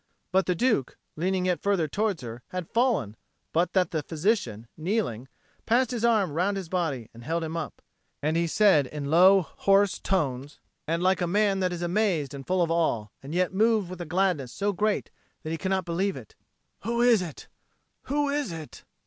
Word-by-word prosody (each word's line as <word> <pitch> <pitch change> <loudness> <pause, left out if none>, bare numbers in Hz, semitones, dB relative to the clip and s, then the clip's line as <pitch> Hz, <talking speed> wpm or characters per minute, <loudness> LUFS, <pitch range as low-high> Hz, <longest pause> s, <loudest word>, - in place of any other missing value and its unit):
But 190 0 +2
the 180 - +2
Duke, 220 - +1 0.2
leaning 185 +3 0
yet 180 -1 0
further 195 -6 +1
towards 200 -1 -1
her, 120 0 -7
had 180 -2 -5
fallen, 230 - +1 0.4
but 170 +2 +1
that 185 -3 +2
the 160 - -1
physician, 155 - -1
kneeling, 160 - -2 0.4
passed 245 +2 +3
his 235 -2 -3
arm 220 -8 +3
round 190 +5 0
his 185 -4 -6
body 155 -11 -2
and 115 +1 -12
held 165 +5 -1
him 160 0 -4
up; 160 -3 -5 0.4
and 155 +2 0
he 170 0 +2
said 165 -6 +4
in 145 +1 -5
low 190 +4 +7
hoarse 195 +4 +2
tones 145 -7 -2 0.3
and 165 +2 0
like 185 0 +2
a 175 - +1
man 200 +1 +2
that 185 -1 +1
is 175 0 -4
amazed 175 -6 0
and 135 -1 -8
full 185 -1 +2
of 165 - -1
awe, 120 -11 0
and 140 +5 -7
yet 185 0 +1
moved 215 -2 +2
with 180 -1 -7
a - - -4
gladness 175 -6 0
so 205 +7 -1
great 210 +3 0 0.3
that 155 - -4
he 165 - -2
cannot 190 -1 -1
believe 185 +3 -1
in 130 - -7
it, - - -25 0.4
"Who 235 +3 0
is 235 -5 +5
it? 165 -5 -7 0.6
Who 290 +1 0
is 285 -7 -1
it?" 155 -7 -9
180 Hz, 200 wpm, -27 LUFS, 155-200 Hz, 0.6 s, low